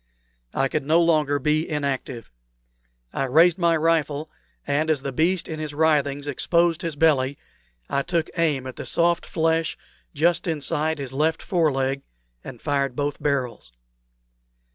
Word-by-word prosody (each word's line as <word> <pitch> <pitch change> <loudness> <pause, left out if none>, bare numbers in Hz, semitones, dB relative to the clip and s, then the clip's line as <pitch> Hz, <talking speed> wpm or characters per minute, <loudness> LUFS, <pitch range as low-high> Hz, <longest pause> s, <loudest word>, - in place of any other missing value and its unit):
I 135 - +2
could 155 +1 -2
no 160 +4 +3
longer 155 -4 +3
be 150 +3 0
inactive. 140 - -3 0.8
I - - -1
raised 165 +7 +4
my 170 -1 +3
rifle, 155 -1 0 0.3
and 145 +3 0
as 145 -4 +1
the 140 - -3
beast 170 +7 +1
in 160 -1 -5
his 155 -2 -5
writhings 145 -2 +1
exposed 170 +4 +1
his 165 -3 -3
belly 140 -3 +2 0.5
I 140 - 0
took 165 +1 -1
aim 155 -6 +1
at 130 - -7
the - - -6
soft 170 0 +1
flesh 160 0 0 0.4
just 170 +5 +2
inside 160 0 -1
his 135 -2 -6
left 155 +3 0
fore 165 -5 +2
leg, 135 0 -1 0.4
and 125 - -9
fired 140 -2 -1
both 145 +1 -2
barrels. 130 - -2
150 Hz, 150 wpm, -24 LUFS, 140-165 Hz, 0.8 s, raised